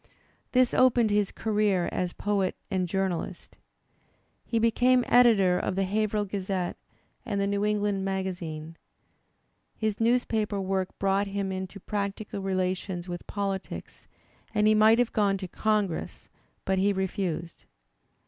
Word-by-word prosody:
This 255 -1 +3
opened 240 -4 +4
his 205 -1 +2
career 210 -4 +1
as 180 -1 -1
poet 200 -2 -1 0.2
and 185 -2 0
journalist. 190 -2 -3 0.9
He 230 - -2
became 245 +2 +3
editor 200 -7 +5
of 185 - -2
The 195 - +1
HaverhiU 210 +1 0
Gazette 190 -2 -2 0.5
and 210 -5 -2
The 200 - +1
New 200 0 0
England 205 -2 0
Magazine, 175 -5 -4 1.0
His 215 -2 -1
newspaper 225 -3 +1
work 190 -1 -2
brought 195 +1 +1
him 195 -1 -2
into 190 +1 -5
practical 200 0 -4
relations 185 -1 -2
with 175 -1 -6
politics, 195 -2 -5 0.5
and 210 0 +3
he 215 - +6
might 215 +1 +6
have 245 -1 +1
gone 200 -3 +2
to 190 -1 -6
Congress; 210 -2 -1 0.4
but 190 0 +1
he 200 +1 +3
refused. 185 -3 -3
200 Hz, 130 wpm, -27 LUFS, 190-215 Hz, 1.0 s, he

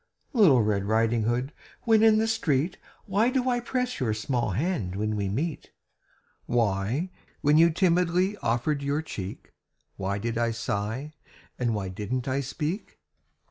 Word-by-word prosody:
Little 165 - +6
Red 100 -2 0
Riding 110 +1 +2
Hood, 125 +5 -1 0.3
when 225 -2 +4
in 220 -1 +6
the 220 +1 +2
street, 165 -6 0 0.3
Why 210 +4 +2
do 255 0 0
I 245 -1 +2
press 250 +1 -2
your 115 -5 0
small 120 +1 -1
hand 110 - -1
when 110 +2 -1
we 100 -2 -1
meet? 145 - -3 0.8
Why, 115 - 0 0.3
when 150 +2 +4
you 165 +1 +7
timidly 180 +2 +2
offered 125 - 0
your 140 +2 -1
cheek, 95 -10 -7 0.5
Why 100 +1 -2
did 115 +2 -2
I 120 0 +2
sigh, 115 +6 -3 0.5
and 120 -3 +1
why 95 -2 -3
didn't 105 +7 -3
I 135 +1 0
speak? 150 - -4
130 Hz, 150 wpm, -27 LUFS, 110-180 Hz, 0.8 s, you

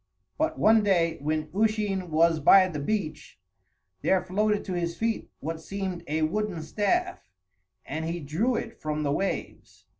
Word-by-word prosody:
But 320 +1 0
one 220 +1 +5
day, 175 -5 +2
when 155 +1 -2
Usheen 205 -3 0
was 165 +1 +3
by 185 +5 +7
the 160 -5 -5
beach, 180 - -3 0.6
there 190 -1 +2
floated 210 +3 0
to 190 - -4
his 170 -1 -2
feet 225 0 -1
what 160 +2 -4
seemed 190 0 -4
a 155 +1 0
wooden 185 0 -1
staff, 355 - 0 0.7
and 160 +1 -4
he 170 +1 -3
drew 170 - 0
it 230 0 -5
from 155 0 -2
the 140 - 0
waves. 195 +7 -4
185 Hz, 155 wpm, -27 LUFS, 160-210 Hz, 0.7 s, by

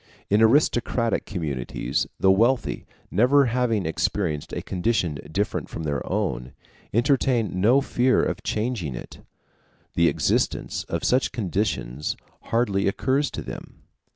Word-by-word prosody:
In 105 +2 +4
aristocratic 115 -1 +2
communities, 75 - -2
the 95 - +5
wealthy, 115 +6 +1 0.2
never 130 +7 +4
having 115 -5 0
experienced 80 -1 -1
a - - -4
condition 90 -5 -1
different 100 +5 -2
from 80 - -6
their 70 -3 -2
own, 60 +1 -2 0.4
entertain 120 -5 +1
no 125 +7 +5
fear 130 -1 +2
of - - -2
changing 105 - -2
it; - - -9 0.7
the 85 0 +3
existence - - 0
of - - -3
such 130 +2 +2
conditions 95 - -2 0.3
hardly 105 -5 +1
occurs 135 +8 +1
to - - -6
them. - - -9
105 Hz, 125 wpm, -24 LUFS, 85-125 Hz, 0.7 s, the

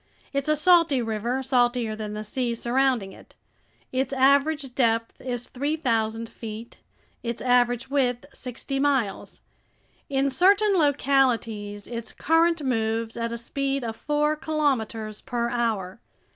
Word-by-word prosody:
It's 275 +2 -1
a 305 - +4
salty 335 -3 +4
river, 235 +3 -2
saltier 245 -3 +1
than 215 -1 -5
the 210 0 -4
sea 235 +2 -2
surrounding 245 -4 +1
it. - - -17 0.6
Its 260 +1 -1
average 275 +1 +3
depth 230 -3 0
is 245 -2 -4
3,000 235 -6 -1
feet, 225 +1 -9 0.4
its 235 -1 -4
average 245 +1 +2
width 250 -4 +1
sixty 265 +2 -5
miles. 270 -8 -1 0.7
In 275 0 +1
certain 400 +8 +4
localities 250 - +1
its 235 -1 -6
current 330 0 +2
moves 225 -3 -1
at 230 0 -2
a 235 - -3
speed 275 +3 -2
of 225 -1 -4
four 295 +4 0
kilometers 245 -9 -1
per 235 -2 -2
hour. 225 -5 -1
245 Hz, 130 wpm, -25 LUFS, 230-275 Hz, 0.7 s, a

